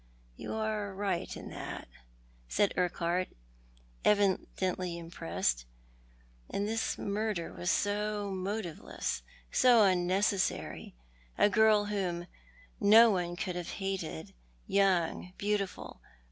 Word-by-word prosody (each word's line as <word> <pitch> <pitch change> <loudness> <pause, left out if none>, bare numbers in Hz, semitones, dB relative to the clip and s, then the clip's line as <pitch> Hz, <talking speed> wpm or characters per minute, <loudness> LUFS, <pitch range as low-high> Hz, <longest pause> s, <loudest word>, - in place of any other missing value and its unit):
You - - -5
are 215 -2 -2
right 195 -3 -2
in - - -8
that," - - -6 0.6
said 205 - +2
Urquhart, 180 0 0 0.8
evidently 185 -3 +1
impressed, 85 - -2 0.8
"and 200 +1 -1
this 225 +1 -1
murder 205 -4 -2
was 175 - -3
so 205 0 0
motiveless, 190 - -3 0.3
so 240 -3 +6
unnecessary; 190 - +1 0.4
a - - +5
girl 215 -1 +5
whom 185 -4 -2 0.5
no 220 +3 +8
one 175 -2 -1
could 180 0 -3
have 175 -1 -4
hated 190 - -4 0.2
— - - -33
young, 180 -2 +1
beautiful. 205 -2 -2
195 Hz, 105 wpm, -31 LUFS, 175-210 Hz, 0.8 s, no